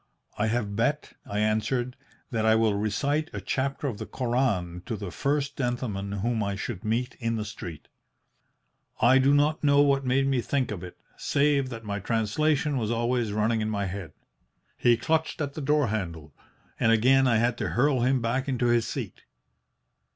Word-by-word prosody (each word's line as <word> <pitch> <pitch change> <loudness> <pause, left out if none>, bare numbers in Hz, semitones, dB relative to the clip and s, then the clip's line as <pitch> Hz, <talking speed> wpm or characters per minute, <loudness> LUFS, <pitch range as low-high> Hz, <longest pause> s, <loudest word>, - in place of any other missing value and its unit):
"'I 105 - +2
have 110 -3 -1
bet,' 140 +7 0
I 100 - -4
answered, 120 +4 0 0.4
'that 115 -3 0
I 110 0 +5
will 110 -2 +3
recite 140 +10 0
a - - -3
chapter 135 +2 -2
of 120 -7 -3
the 110 - -5
Koran 115 -8 -1
to 115 - -2
the 100 -3 -6
first 140 - -1
gentleman 120 -6 -2
whom 115 -1 0
I 100 -1 -1
should 100 -1 -5
meet 120 +4 -1
in 115 -2 -1
the 110 -1 -3
street.' 85 -7 -8 1.1
"I 130 +3 +6
do 135 +1 +4
not 145 +2 +2
know 140 -1 +5
what 140 -1 +3
made 130 +1 +2
me 135 -2 +1
think 130 -1 -1
of 95 -4 -5
it, 90 - -9 0.2
save 140 -2 +1
that 115 -2 -7
my 100 -1 -3
translation 130 +7 0
was 110 -2 -2
always 120 -1 0
running 110 +2 +1
in 110 - -1
my 100 -2 -1
head. 95 -4 -6 0.6
He 120 -1 +3
clutched 160 +7 0
at 145 -2 -2
the 155 - -6
door 145 -3 +2
handle, 85 -8 -4 0.5
and 115 - +3
again 130 +4 +4
I 115 -2 +3
had 120 +1 +2
to - - -1
hurl 135 +1 +2
him 125 0 +2
back 130 +4 -1
into 125 -2 0
his 120 -1 +2
seat. - - -6
120 Hz, 185 wpm, -27 LUFS, 105-135 Hz, 1.1 s, I